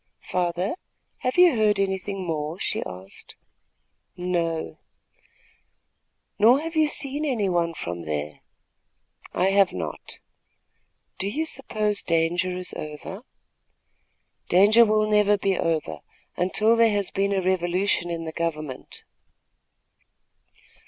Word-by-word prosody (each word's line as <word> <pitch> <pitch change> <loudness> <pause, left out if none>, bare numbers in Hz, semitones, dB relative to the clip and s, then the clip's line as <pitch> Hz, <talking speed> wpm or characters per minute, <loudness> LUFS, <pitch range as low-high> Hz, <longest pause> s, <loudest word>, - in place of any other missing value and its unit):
"Father, 180 +2 -1 0.5
have 255 +5 -2
you 355 -6 +7
heard 215 -2 +3
anything 195 0 -2
more?" 155 0 -3
she - - -2
asked. 95 +1 -10 0.8
"No." 165 - -2 1.6
"Nor 235 +6 +6
have 330 +1 -6
you 310 -1 +4
seen 290 0 -2
any 245 -9 0
one 170 -2 0
from 85 - -5
there?" 75 -1 -4 0.9
"I 185 +2 +2
have 195 -1 +4
not." 80 -4 -6 1.0
"Do 190 - -1
you 305 +11 -1
suppose 215 -8 -1
danger 170 +2 0
is 180 -1 -4
over?" 155 +7 -7 1.3
"Danger 210 +6 +6
never 215 -1 +3
will - - +3
be 195 -1 0
over, 155 - -1 0.4
until 215 +5 +2
there 230 -1 +5
has 205 -2 0
been 200 +1 0
a 195 - +1
revolution 180 0 0
in 165 -1 -3
the 160 - -5
government." 155 -5 -4
185 Hz, 115 wpm, -25 LUFS, 165-210 Hz, 1.6 s, you